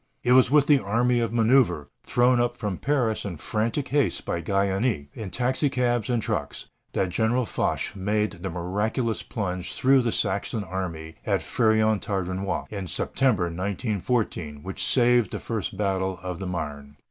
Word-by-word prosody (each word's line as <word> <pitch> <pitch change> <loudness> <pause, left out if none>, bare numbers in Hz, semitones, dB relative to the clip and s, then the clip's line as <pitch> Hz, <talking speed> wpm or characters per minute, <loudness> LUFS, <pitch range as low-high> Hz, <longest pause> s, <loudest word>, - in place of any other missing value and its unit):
It 125 - +2
was 125 -1 +6
with 145 0 +5
the 145 -2 +5
"army 120 +3 +1
of 115 -1 0
manœuvre," 115 - +3 0.2
thrown 125 0 +3
up 120 0 -1
from 105 -5 -3
Paris 125 -6 0
in 95 -5 -5
frantic 115 - -1
haste 145 -2 +1
by 85 - -2
Galliéni, 100 - 0
in 110 -4 -6
taxicabs 125 - 0
and 120 -3 +1
trucks, 70 -2 -3 0.3
that 95 - 0
General 115 +6 +1
Foch - - -1
made 105 +2 0
the 95 - -3
miraculous 105 +7 -1
plunge 90 -4 -4
through 135 0 +4
the 120 -2 0
Saxon 100 +2 -1
army 85 -5 -5
at - - +1
Fère 110 -2 +2
en 110 -2 +2
Tardenois, 95 -2 -2
in 100 -3 -4
September, 120 -1 +1
1914, 90 - -2
which 95 - -4
saved 120 -4 +3
the - - -5
first 110 -4 -4
battle 95 -2 0
of 90 -2 -4
the 95 - -4
Marne. 75 -5 -5
105 Hz, 160 wpm, -25 LUFS, 95-120 Hz, 0.3 s, was